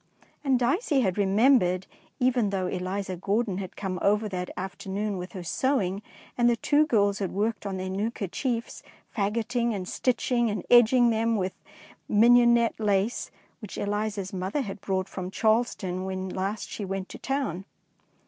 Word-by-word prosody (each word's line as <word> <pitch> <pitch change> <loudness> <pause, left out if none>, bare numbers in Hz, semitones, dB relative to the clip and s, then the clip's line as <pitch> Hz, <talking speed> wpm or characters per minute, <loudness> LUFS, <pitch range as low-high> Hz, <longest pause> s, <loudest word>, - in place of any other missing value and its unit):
And 270 -3 +3
Dicey 275 - +1
had 190 -6 +1
remembered, 195 -2 +3 0.3
even 245 -4 +2
though 190 -2 -1
Eliza 185 +1 -3
Grordon 200 +2 -1
had 185 -2 -7
come 190 -3 -3
over 210 +2 +2
that 180 -2 -4
afternoon 195 +2 -3
with 180 +1 -7
her 185 -3 -6
sewing, 200 -1 0 0.3
and 240 -1 +4
the 240 - +3
two 295 +7 +2
girls 205 -4 +2
had 195 -3 -2
worked 210 0 -1
on 190 -1 -3
their 185 0 -4
new 200 +4 -1
kerchiefs, 230 +3 -3 0.3
fagoting 230 +2 0
and 185 -2 -5
stitching 245 0 +1
and 205 -3 -3
edging 240 0 +6
them 225 +1 +1
with 185 -3 -1 0.5
some 205 - +1
Mignonette 235 0 +5
lace 205 +1 0 0.3
which 210 -5 -8
Eliza's 205 -1 -2
mother 190 +9 -2
had 200 -5 -6
brought 190 -1 -1
from 185 -1 -5
Charleston 210 -4 0
when 190 0 -4
last 195 +3 -3
she 210 - -6
went 195 0 -4
to - - -9
town. 265 - -2
205 Hz, 160 wpm, -27 LUFS, 190-235 Hz, 0.5 s, edging